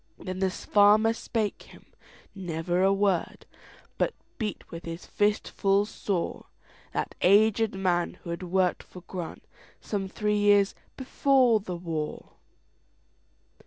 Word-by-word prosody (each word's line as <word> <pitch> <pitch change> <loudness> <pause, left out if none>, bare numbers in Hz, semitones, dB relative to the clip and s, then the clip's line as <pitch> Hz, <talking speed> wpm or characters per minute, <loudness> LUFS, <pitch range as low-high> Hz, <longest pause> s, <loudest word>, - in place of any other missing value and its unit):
Then 185 -1 -6
the 190 0 +2
farmer 210 +4 +4
spake 225 -2 -2
him - - -16 0.5
never 175 -1 -2
a 195 +1 +4
word, 195 -3 0 0.5
But - - +1 0.2
beat 210 -4 -4
with 165 +1 -8
his 165 +1 -6
fist 205 +1 0
full 200 0 +2
soreThat 200 -4 -5
aged 215 +2 +4
man, 180 -2 0
who 170 - -5
had 170 - -4
worked 180 0 +1
for 180 - -13
GrantSome 190 +3 -7
three 210 +1 0
years 205 -1 +4 0.2
before 260 -3 +3
the 185 -3 -6
war. 160 -3 -5
195 Hz, 120 wpm, -27 LUFS, 180-210 Hz, 0.5 s, farmer